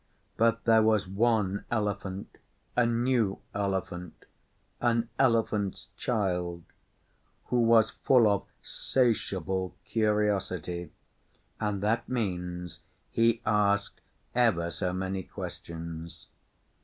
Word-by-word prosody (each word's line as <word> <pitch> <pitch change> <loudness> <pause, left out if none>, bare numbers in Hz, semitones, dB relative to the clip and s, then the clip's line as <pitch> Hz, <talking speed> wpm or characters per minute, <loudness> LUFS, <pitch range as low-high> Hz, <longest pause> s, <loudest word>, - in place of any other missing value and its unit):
But 115 0 +2
there 110 -1 +5
was 110 -3 +3
one 100 -1 +1
Elephant 100 -3 -3 0.4
a 125 -1 +4
new 120 -3 +1 0.2
Elephant 95 -3 -3 0.5
an 115 -1 +1
Elephant's 110 -5 +1
Child 90 -7 -1 0.9
who 125 - +2
was 115 -1 +5
full 125 -4 +4
of 100 -2 +1 0.2
'satiable 95 -7 0
curtiosity, 100 -6 0 0.7
and 105 -2 -1
that 110 +3 0
means 90 -7 -3 0.3
he 115 0 +2
asked 100 -1 +1 0.3
ever 100 -9 +2
so 90 +2 -2
many 95 +1 -2
questions. 85 -1 -7
100 Hz, 95 wpm, -29 LUFS, 95-115 Hz, 0.9 s, there